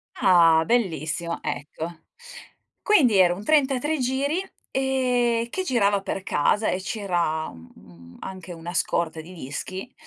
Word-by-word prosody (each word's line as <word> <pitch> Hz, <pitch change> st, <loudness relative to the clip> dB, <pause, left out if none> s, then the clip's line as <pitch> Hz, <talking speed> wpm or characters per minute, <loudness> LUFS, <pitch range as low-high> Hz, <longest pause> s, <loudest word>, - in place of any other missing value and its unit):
Ah, 165 Hz, -3 st, +5 dB
bellissimo 170 Hz, -, -1 dB
ecco. 160 Hz, +3 st, -5 dB, 0.8 s
Quindi 270 Hz, -, +4 dB
era 180 Hz, -2 st, +5 dB
un 195 Hz, +4 st, -8 dB
33 295 Hz, +2 st, +2 dB
giri, 270 Hz, +6 st, 0 dB, 0.3 s
ehm, 250 Hz, -3 st, +1 dB
che 375 Hz, +9 st, -3 dB
girava 205 Hz, -, +2 dB
per 195 Hz, -1 st, -3 dB
casa 205 Hz, +5 st, +1 dB
e 185 Hz, -, -1 dB
c'era, 175 Hz, -6 st, -1 dB
mhmm, 85 Hz, +1 st, -16 dB
anche 185 Hz, -1 st, -8 dB
una 170 Hz, +1 st, -7 dB
scorta 165 Hz, -1 st, -1 dB
di 170 Hz, +4 st, -12 dB
dischi, 185 Hz, -, -6 dB
190 Hz, 125 wpm, -24 LUFS, 165-245 Hz, 0.8 s, Ah